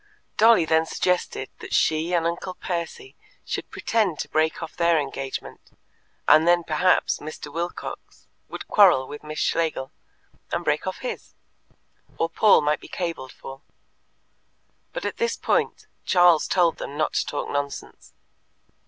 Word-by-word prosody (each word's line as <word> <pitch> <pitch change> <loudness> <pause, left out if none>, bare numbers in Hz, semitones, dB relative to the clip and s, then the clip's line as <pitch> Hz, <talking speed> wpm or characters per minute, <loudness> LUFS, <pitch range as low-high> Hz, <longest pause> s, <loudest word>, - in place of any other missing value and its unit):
Dolly 220 -5 +6
then 160 +1 +2
suggested 180 -8 -1
that - - -4
she 160 +2 +2
and 170 -2 +1
Uncle 175 +2 -3
Percy 175 - -5 0.3
should - - -4
pretend 210 -8 0
to - - -5
break 160 +2 0
off 165 - -8
their 170 -2 +3
engagement, 135 -2 -6 0.5
and 160 +2 +6
then 175 0 +4
perhaps 165 +3 +2
Mr. 150 -1 -8
Wilcox 170 +1 -6 0.2
would - - -7
quarrel 175 -11 +5
with 145 - -8
Miss 155 0 -7
Schlegel, 160 -5 -1 0.6
and - - -2
break 150 +5 0
off 185 - -4
his; 250 - -6 0.8
or 165 - 0
Paul 210 +2 +5
might 150 0 +1
be - - -12
cabled 165 -7 -4
for. 135 0 -11 1.3
But - - -5
at - - -3
this 470 0 0
point - - 0 0.2
Charles 175 -4 +4
told 175 -3 +2
them 145 - -6
not 155 - 0
to - - +1
talk 145 - -4
nonsense. 145 0 -5
165 Hz, 145 wpm, -24 LUFS, 150-180 Hz, 1.3 s, Dolly